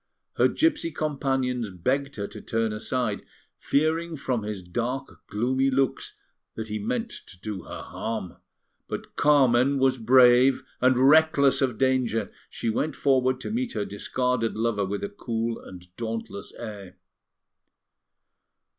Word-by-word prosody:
Her - - +5
gipsy 320 - +1
companions 135 -6 -1
begged 135 +10 -1
her 100 - -3
to - - -9
turn 115 -1 -1
aside, 110 0 -2 0.4
fearing 160 +3 0
from 130 -4 -1
his 105 -3 -5
dark, 120 +10 -4
gloomy 130 +5 +1
looks 135 0 0 0.4
that 110 -1 -5
he 105 - -3
meant 235 0 -2 0.2
to 90 - -14
do 105 -1 -5
her - - -7
harm; 110 -6 -5 0.5
but - - -6
Carmen 140 -2 +4
was 130 -1 +2
brave, 125 +2 +6 0.2
and, 130 0 +4
reckless 150 -3 +5
of 125 -5 +1
danger, 130 -3 +1 0.2
she - - -5
went 140 +8 0
forward 130 -2 +2
to - - -4
meet 240 +2 -2
her 100 - -2
discarded 120 +3 -1
lover 110 -3 0
with 100 +1 -3
a 200 - -2
cool 115 - -3
and 90 -1 -13
dauntless 115 -3 -5
air. 105 -5 -8
125 Hz, 135 wpm, -26 LUFS, 110-135 Hz, 0.5 s, brave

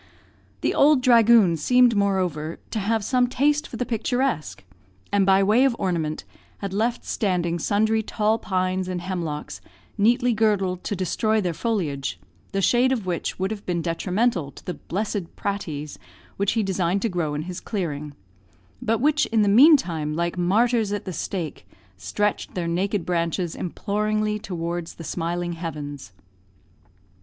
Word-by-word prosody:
The - - +1
"ould 285 -3 +4
dhragoon" 230 -7 +6
seemed, 245 +7 +4
moreover, 180 -6 0
to 220 - -1
have 215 +2 0
some 250 +3 +2
taste 290 +4 +1
for 230 - -8
the 250 - -1
picturesque, 245 - -1 0.5
and 200 -1 +2
by 195 0 +5
way 215 +6 +4
of 270 -3 +3
ornament, 160 -4 -2 0.3
had 200 -2 -5
left 230 +4 -1
standing 175 -5 -1
sundry 220 +5 +2
tall 220 0 0
pines 185 -2 -1
and 180 -1 -3
hemlocks 170 -5 -4 0.4
neatly 240 +3 +3
girdled 200 -4 +1
to 205 - -1
destroy 215 +4 0
their 180 -4 -1
foliage, 160 - -2 0.3
the 195 -1 -1
shade 250 +5 +4
of 235 -7 -1
which 175 -2 -2
would 190 +2 -1
have 210 -2 -5
been 170 -2 -1
detrimental 180 - 0
to - - -14
the 180 - -3
"blessed 200 -1 -4
praties" 155 -7 -4 0.4
which 200 0 0
he 225 -2 +1
designed 190 0 0
to - - +2
grow 170 -7 -2
in 150 - -3
his 180 +1 -6
clearing, 150 -8 -4 0.7
but 225 +1 +1
which, 300 +2 +3
in 225 -2 +2
the - - +2
meantime, 200 - +5
like 170 +2 -1
martyrs 215 +5 +2
at 205 - -3
the 185 - -4
stake, 170 -1 -4 0.3
stretched 95 - -2
their 175 -2 -2
naked 190 +2 -1
branches 170 0 -1
imploringly 210 +3 -1
towards 170 -3 -4
the 165 - -9
smiling 175 +1 -2
heavens. 145 - -6
195 Hz, 155 wpm, -24 LUFS, 170-220 Hz, 0.7 s, dhragoon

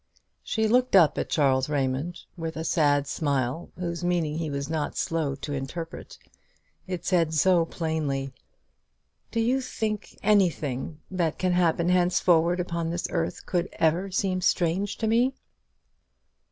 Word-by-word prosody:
She 220 -1 0
looked 250 0 +3
up 170 -5 +5
at - - -3
Charles 135 -2 +2
Raymond 145 +4 -1
with 165 -1 -5
a 160 - -3
sad 145 -3 +2
smile, 140 0 -1
whose 175 -1 -4
meaning 165 -3 0
he 160 -2 -2
was 140 0 -3
not 155 -2 -2
slow 155 -4 -1
to 145 +1 -6
interpret. 160 +5 -6 0.7
It 180 -2 -4
said 165 -3 +2
so 170 +2 +4
plainly, 150 -5 -2 1.0
"Do 230 - -2
you 250 +4 +2
think 215 -4 -4
anything 160 -8 +1
that 170 -4 0
can 185 -1 +1
happen 175 -1 +2
henceforward 175 -1 +3
upon 170 -2 -2
this 170 +1 -2
earth 165 -2 -2
could 175 -2 -1
ever 170 +5 +1
seem 185 -1 0
strange 185 +3 +1
to 225 - -2
me?" 240 +4 +2
170 Hz, 140 wpm, -26 LUFS, 150-185 Hz, 1.0 s, up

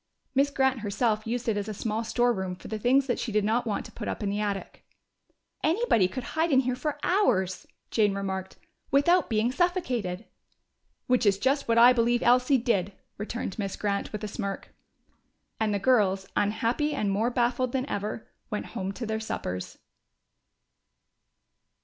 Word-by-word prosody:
Miss 275 +1 +3
Grant 265 -2 +1
herself 215 +1 -1
used 245 +2 -2
it 220 -2 +1
as 205 +1 -3
a 215 - -4
small 220 +2 -2
storeroom 225 -6 0
for - - -12
the 220 - -3
things 260 +5 +3
that 245 - -1
she 235 - -3
did 210 0 +2
not 230 +3 +1
want 210 - -2
to - - -11
put - - -7
up - - -3
in 200 - 0
the 205 - -2
attic. 205 -2 -4 0.8
"Anybody 320 - +3
could 255 +6 -6
hide 320 +6 0
here 260 -3 +2
for 290 +3 -3
hours," 215 - +1 0.2
Jane 210 -3 +2
remarked, 190 -1 -4 0.3
"without 340 +6 +3
being 225 +1 +1
suffocated." 255 - -1 0.8
"Which 250 0 +2
is 200 -3 +4
just 275 +6 +1
what 230 0 +2
I 240 +2 +8
believe 240 0 +2
Elsie 250 +3 +4
did!" 205 -6 0 0.3
returned 215 -1 -4
Miss 195 -2 -2
Grant, 200 -1 -2
with 210 0 -5
a - - -2
smirk. 200 -2 -5 0.9
And 220 -1 +1
the 205 - +1
girls, 195 -4 +2
unhappy 230 +8 0
and 205 -2 0
more 215 +5 +1
baffled 250 +1 0
than 265 +1 -1
ever, 210 0 -4 0.2
went 210 - -3
home 190 0 -3
to 235 - -5
their 220 0 -2
suppers. 90 - -5
225 Hz, 170 wpm, -27 LUFS, 205-255 Hz, 0.9 s, I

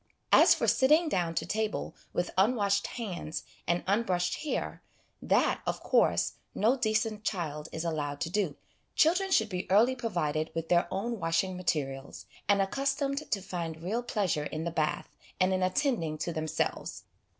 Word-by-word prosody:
As - - +7
for - - -1
sitting 305 +5 +4
down 175 - 0
to - - -1
table 220 0 -2 0.2
with 175 - -1
unwashed 200 0 +2
hands 180 -9 -5 0.2
and 170 +1 +1
unbrushed 185 -3 +1
hair, 305 - -3 0.4
that, - - +2
of - - -2
course, - - +3 0.2
no 225 +6 +3
decent 220 -3 0
child 155 -7 -3
is 160 +1 -4
allowed 145 -3 -2
to 165 - -1
do. 185 -7 0 0.4
Children 360 +5 +3
should 220 - +3
be 180 -2 -4
early 225 +7 +5
provided 165 -10 -1
w: 165 - -4
th - - -23
their 175 -1 +3
own 225 +4 -2
washing 185 +3 0
materials, 140 -6 -3 0.2
and 200 -1 +5
accustomed 275 +6 -1
to 200 - 0
find 165 -4 -5
real 215 +7 -1
pleasure 195 -10 -1
in 155 +1 -4
the 170 - -2
bath, 155 -2 -2 0.2
and 185 0 +3
in 185 - 0
attending 185 - 0
to 170 +2 -3
themselves. 155 -1 -2
190 Hz, 160 wpm, -30 LUFS, 165-225 Hz, 0.4 s, As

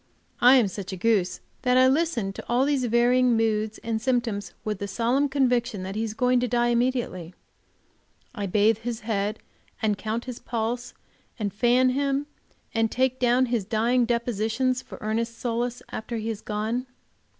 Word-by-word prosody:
I 250 +2 +7
am 245 -6 +4
such 195 0 -6
a 190 - -5
goose 190 -2 +1 0.2
that 250 -1 +3
I 255 - +7
listen 260 -8 +1
to - - -8
all 245 +3 +3
these 280 -3 +1
varying 240 +1 +3
moods 220 -1 0
and 225 -1 -2
symptoms 230 -6 -1
with 210 -2 -2
the 200 - -3
solemn 245 +7 +1
conviction 245 -6 +1
that 190 +1 -5
he 220 - -1
is 220 -1 -4
going 250 +1 +3
to 250 - 0
die 240 0 +1
immediately; 235 -8 -1 1.0
I 205 -5 -3
bathe 210 +3 +3
his 235 0 -4
head, 210 -1 -1 0.4
and 210 -3 0
count 220 +3 -3
his 250 -2 -6
pulse, 235 +1 -3 0.4
and 205 -3 -3
fan 245 +4 +3
him, 275 +2 0 0.5
and 225 0 +2
take 260 +1 0
down 250 +1 +3
his 235 -4 -1
dying 235 +4 +2
depositions 235 +2 0
for - - -11
Ernest's 230 +2 -2
solace 240 0 -2
after 230 +2 -4
he 220 +1 -3
has 220 -2 -4
gone. 220 +4 -2
235 Hz, 175 wpm, -25 LUFS, 215-250 Hz, 1.0 s, I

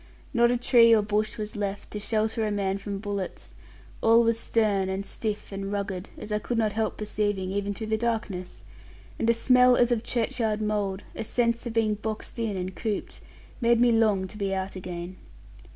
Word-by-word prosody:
Not 235 -1 +5
a 245 - +2
tree 235 -2 +6
or 215 - +3
bush 210 +1 -1
was 210 -1 -5
left, 205 -1 -4
to 210 - -4
shelter 220 +1 0
a 215 - 0
man 200 -1 -1
from 200 0 -4
bullets: 200 -2 -5 0.5
all 230 +1 +6
was 230 0 +2
stern, 205 -5 +1
and 190 +1 -3
stiff, 210 0 -4
and 195 0 -4
rugged, 200 -2 -3
as 215 - -7
I 210 - +1
could 235 +3 -3
not 215 -2 +1
help 220 0 -1
perceiving, 205 -3 -1
even 200 0 -2
through 220 - -5
the 220 - +2
darkness, 220 -6 -3 0.6
and 230 - +1
a - - +6
smell 250 +1 +5
as 245 0 +3
of 235 -2 +2
churchyard 225 -2 -1
mould, 205 -2 -1
a - - -3
sense 235 +1 0
of 230 - -4
being 225 -2 +2
boxed 215 +2 -5
in 220 -4 -1
and 185 +1 -4
cooped, 215 -3 -3 0.4
made 235 0 +4
me 240 0 +5
long 215 -4 +3
to 210 - -10
be 195 -1 0
out 190 0 -3
again. 180 0 -6
215 Hz, 200 wpm, -27 LUFS, 200-230 Hz, 0.6 s, tree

